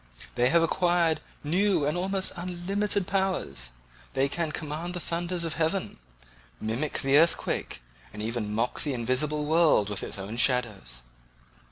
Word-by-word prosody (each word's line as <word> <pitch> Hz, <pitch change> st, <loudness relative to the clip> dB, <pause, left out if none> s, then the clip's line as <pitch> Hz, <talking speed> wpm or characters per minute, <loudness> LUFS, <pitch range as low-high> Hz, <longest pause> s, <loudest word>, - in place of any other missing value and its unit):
They 125 Hz, 0 st, +3 dB
have 165 Hz, +2 st, +4 dB
acquired 170 Hz, -2 st, +2 dB, 0.2 s
new 175 Hz, +1 st, +2 dB
and 150 Hz, +3 st, 0 dB
almost 190 Hz, +2 st, 0 dB
unlimited 185 Hz, +3 st, -1 dB
powers; 185 Hz, -, -1 dB, 0.4 s
they 135 Hz, +1 st, +2 dB
can 160 Hz, +2 st, -2 dB
command 160 Hz, +4 st, -4 dB
the -, -, -2 dB
thunders 170 Hz, +1 st, -2 dB
of 165 Hz, -2 st, -2 dB
heaven, 165 Hz, +4 st, -1 dB, 0.6 s
mimic 115 Hz, +8 st, -2 dB
the 135 Hz, +1 st, +5 dB
earthquake, 165 Hz, -, 0 dB, 0.3 s
and 105 Hz, -, -10 dB
even 110 Hz, -1 st, -2 dB
mock 115 Hz, +3 st, -1 dB
the 145 Hz, -3 st, -1 dB
invisible 135 Hz, +5 st, 0 dB
world 155 Hz, -, +4 dB
with 100 Hz, -, -3 dB
its -, -, -5 dB
own 100 Hz, +4 st, -6 dB
shadows." 115 Hz, -, +1 dB
155 Hz, 145 wpm, -27 LUFS, 120-175 Hz, 0.6 s, the